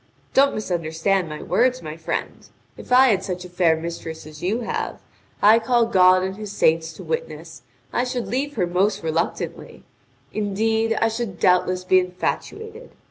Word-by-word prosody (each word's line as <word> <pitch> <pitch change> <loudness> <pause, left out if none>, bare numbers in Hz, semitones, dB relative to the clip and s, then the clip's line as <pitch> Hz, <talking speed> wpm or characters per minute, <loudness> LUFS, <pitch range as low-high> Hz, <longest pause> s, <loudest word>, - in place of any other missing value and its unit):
Don't 275 +1 +4
misunderstand 175 -1 -1
my 150 - -7
words, 250 +8 +1
my 155 0 -6
friend: 165 0 -5 0.3
if - - -13
I 260 +1 +7
had 195 -4 +1
such 180 -1 -5
a - - -10
fair 175 -2 +3
mistress 160 -1 -6
as 155 -1 -12
you 210 +7 -1
have, 225 - -3 0.4
I 215 +2 +7
call 235 +1 +2
God 185 -4 +5
and 190 +1 -4
His 210 -2 -7
saints 165 -4 +2
to - - -10
witness, 485 +1 -5 0.3
I 245 - +1
should 250 -1 -3
leave 285 +3 -2
her 180 - +1
most 185 +4 0
reluctantly; 165 +1 -3 0.5
indeed, 220 +2 0
I 225 - +3
should 225 -5 -4
doubtless 180 -1 +2
be 185 0 +4
infatuated. 435 - -4
190 Hz, 165 wpm, -22 LUFS, 175-230 Hz, 0.5 s, I